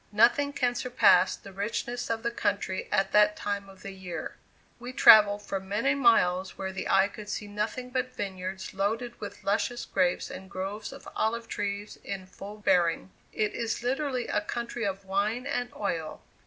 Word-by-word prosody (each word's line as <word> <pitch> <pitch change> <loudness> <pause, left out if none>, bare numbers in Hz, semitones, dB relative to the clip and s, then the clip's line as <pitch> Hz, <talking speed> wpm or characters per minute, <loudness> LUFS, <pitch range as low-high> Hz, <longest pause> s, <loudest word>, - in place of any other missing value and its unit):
Nothing 245 +7 +4
can 250 -3 +1
surpass 250 0 +4
the 195 - -13
richness 230 +5 -3
of 225 -1 -2
the 235 - 0
country 200 -4 -1
at 195 - +2
that 210 0 +5
time 200 -1 -3
of 190 -1 -15
the 195 - -6
year. 190 -2 -6 0.4
We 245 +2 -7
travelled 205 -5 +7
for 195 - -3
many 205 +8 0
miles 190 -9 +3
where 190 0 -3
the 190 - -4
eye 195 0 +5
could 210 0 -10
see 210 - -3
nothing 215 +5 -4
but 255 0 -2
vineyards 190 -1 -5
loaded 225 +5 -2
with 205 - -7
luscious 225 +4 0
grapes 180 -2 0
and 190 0 -9
groves 200 +3 -5
of - - -11
olive 230 +1 -1
trees 205 0 -4
in 195 -2 -5
full 195 +3 -10
bearing. 180 -3 +2 0.2
It 215 -1 -1
is 230 0 -2
literally 260 0 -1
a 210 - 0
country 235 +1 -4
of 195 0 -4
wine 205 +6 0
and 245 -3 -2
oil. 165 -6 -3
205 Hz, 175 wpm, -28 LUFS, 195-235 Hz, 0.4 s, travelled